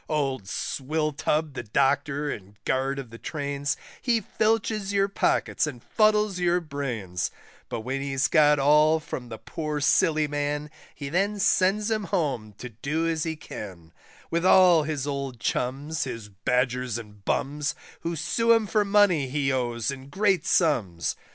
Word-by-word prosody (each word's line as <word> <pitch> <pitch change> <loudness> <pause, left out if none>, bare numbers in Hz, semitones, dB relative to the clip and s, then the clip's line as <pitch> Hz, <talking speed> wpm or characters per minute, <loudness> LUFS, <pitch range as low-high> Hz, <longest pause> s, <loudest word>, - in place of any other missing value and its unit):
Old 135 -8 -1
Swilltub 150 +4 -1
the 130 - -4
doctor 140 +5 +1
and 100 0 -8
guard 135 +1 0
of 130 -4 -7
the 115 - -10
Trains, 145 -1 -2 0.2
He 240 -3 +2
filches 215 -1 0
your 200 -1 +2
pockets 195 -5 +1
and 125 -6 -7
fuddles 210 -3 +2
your 175 0 +2
brains; 125 - -3 0.4
But 115 - -3
when 130 +4 -3
he's 135 -1 0
got 150 -2 +5
all 150 +3 +5
from 125 -5 -7
the 110 - -6
poor 150 +2 -4
silly 155 +1 +3
man, 145 +1 -2 0.2
He 140 -2 -6
then 195 +6 +1
sends 200 +2 +2
him 215 -2 0
home 140 - -1
to 125 - -7
do 145 +9 -2
as 165 -1 -1
he 160 -1 -2
can, 90 - -9 0.4
With 170 +1 0
all 180 -3 +7
his 150 -3 -2
old 140 -4 -4
chums, 140 +8 -2
his 115 -5 -6
badgers 125 +3 0
and 105 -3 -11
bums, 145 +6 -1 0.2
Who 170 0 -3
sue 230 +9 +2
him 225 -1 +3
for 210 +1 +2
money 200 -8 +3
he 135 0 0
owes 120 -2 -1
in 135 0 -9
great 190 -1 +1
sums. 110 - +1
145 Hz, 155 wpm, -26 LUFS, 130-170 Hz, 0.4 s, all